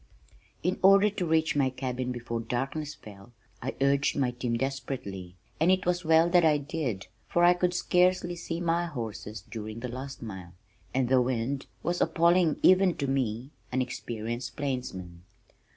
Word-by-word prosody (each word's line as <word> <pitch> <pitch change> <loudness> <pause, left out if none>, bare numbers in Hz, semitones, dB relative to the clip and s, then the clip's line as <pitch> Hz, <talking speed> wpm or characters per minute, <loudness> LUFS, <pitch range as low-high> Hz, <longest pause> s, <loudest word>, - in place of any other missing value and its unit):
In 180 +2 0
order 195 +2 +6
to 180 -3 -3
reach 160 -1 +2
my 140 -2 +3
cabin 130 -1 -3
before 120 -1 -4
darkness 135 +6 -3
fell, 105 +2 -14 0.3
I 130 - -4
urged 140 +1 +2
my 130 -3 +1
team 120 -1 -2
desperately, 115 -9 -4 0.2
and 165 +4 +4
it 185 0 +1
was 180 0 0
well 160 +1 +5
that 175 -1 +5
I 155 -2 +5
did, 140 -9 -3 0.2
for 175 - +2
I 175 0 +7
could 180 0 0
scarcely 180 0 +2
see 170 -1 -4
my 170 0 0
horses 115 -6 -6
during 110 0 -7
the 125 - -4
last 130 +2 -7
mile, 95 -6 -8 0.4
and 130 -1 +1
the 130 0 +4
wind 130 +2 -2 0.2
was 175 +2 -1
appalling 170 0 +3
even 185 -1 +5
to 140 - -1
me 130 -1 -1 0.2
an 130 - 0
experienced 120 0 -5
plainsman. 125 -11 -4
135 Hz, 165 wpm, -28 LUFS, 120-170 Hz, 0.4 s, I